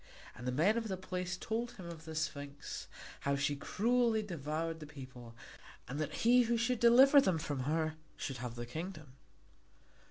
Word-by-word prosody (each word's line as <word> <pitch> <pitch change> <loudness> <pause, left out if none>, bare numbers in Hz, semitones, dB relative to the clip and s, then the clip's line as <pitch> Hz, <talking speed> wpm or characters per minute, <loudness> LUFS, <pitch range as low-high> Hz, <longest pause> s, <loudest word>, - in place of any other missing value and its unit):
And 125 +1 -7
the - - +1
men 180 - +3
of 225 - -4
the 190 -2 -2
place 180 0 -3
told 230 +5 -3
him 185 - -10
of 165 -2 -8
the 160 -1 -7
Sphinx, 145 -2 -4 0.3
how 140 0 0
she 140 +1 0
cruelly 230 - +1
devoured 165 -2 -3
the 155 - -8
people, 125 -5 -10 0.5
and 135 +4 -4
that 155 - -1
he 250 +2 +7
who 235 0 +2
should 245 +1 +1
deliver 265 +5 +8
them 190 -8 +2
from 145 -5 -3
her 155 +1 0 0.2
should 135 - -4
have 120 -1 -5
the 120 0 -5
kingdom. 155 +1 -7
160 Hz, 180 wpm, -34 LUFS, 140-220 Hz, 0.5 s, deliver